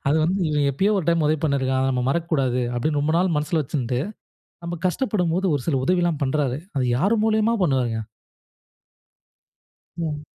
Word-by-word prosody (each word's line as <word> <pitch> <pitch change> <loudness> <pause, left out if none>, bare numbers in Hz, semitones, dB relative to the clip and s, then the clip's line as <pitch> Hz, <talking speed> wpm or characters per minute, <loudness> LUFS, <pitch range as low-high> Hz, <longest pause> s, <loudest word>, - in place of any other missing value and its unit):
அது 150 - +3
வந்து, 185 +4 0
"இவன் 145 -2 +1
எப்பயோ 195 +10 +1
ஒரு 180 - -2
டைம் 165 -2 +3
உதவி 155 +1 +2
பண்ணியிருக்கான் 130 -3 +1
அத 135 - +1
நம்ப 125 - 0
மறக்கக்கூடாது." 135 -6 0
அப்படின்னு 145 +5 0
ரொம்ப 150 +2 0
நாள் 180 -1 +1
மனசுல 155 +2 0
வச்சுட்டு 125 -3 -2 0.7
நம்ப 170 +1 -3
கஷ்டப்படும்போது 185 -3 0
ஒரு 140 - -2
சில 155 - +1
உதவிலாம் 175 -3 +1
பண்ணுறாரு. 135 -1 0 0.2
அது 130 - +1
யார் 200 - +2
மூலியமா 220 +1 +2
பண்ணுவாருங்க? 125 -8 +1 2.0
ம். 150 -3 -4
150 Hz, 155 wpm, -23 LUFS, 135-175 Hz, 2.0 s, அது